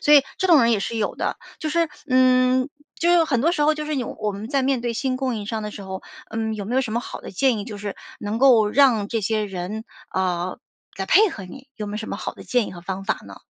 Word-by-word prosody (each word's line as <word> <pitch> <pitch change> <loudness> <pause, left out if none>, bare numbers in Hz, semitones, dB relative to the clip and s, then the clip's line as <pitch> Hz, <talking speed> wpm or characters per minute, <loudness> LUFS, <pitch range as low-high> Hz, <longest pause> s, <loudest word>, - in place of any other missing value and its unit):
所 295 - +6
以 285 - +8 0.2
这 375 - +2
种 320 -8 +7
人 235 - +4
也 210 - +2
是 230 - -3
有 215 - -1
的。 - - -2 0.2
就 310 - -3
是 335 0 +1 0.2
嗯， 255 +1 +4 0.3
就 345 +1 +3
是 340 -2 +5
很 250 -7 +1
多 335 +4 +3
时 345 - -1
候 305 +1 +4
就 305 - -4
是 305 -1 -2
有 250 -3 -2
我 215 -1 -1
们 205 +3 -6
在 275 -1 +1
面 265 -1 +1
对 235 -1 -2
新 255 +1 -1
供 255 -3 -1
应 210 - -5
商 220 +1 -3
的 210 - -4
时 205 - -8
候， 190 0 -6 0.3
嗯， 220 0 -2
有 205 -2 -5
没 235 +5 -3
有 265 - +4
什 225 -4 -3
么 235 - +1
好 - - -7
的 - - -8
建 240 +4 +2
议 205 - -4
就 210 - -6
是 205 -1 -5 0.2
能 210 +2 -3
够 235 -5 +6
让 235 -6 +4
这 225 -1 -1
些 215 +1 0
人， 195 +3 -5 0.3
呃， 180 -1 -1 0.4
来 195 - -2
配 410 - +5
合 225 - -7
你？ 260 +9 -12
有 210 - -4
没 205 - -5
有 - - -3
什 220 - -6
么 - - -3
好 - - -4
的 - - -12
建 245 -4 +1
议 - - -7
和 175 - -9
方 190 +2 -5
法 - - 0
呢？ - - -11
230 Hz, 305 characters per minute, -23 LUFS, 205-270 Hz, 0.4 s, 以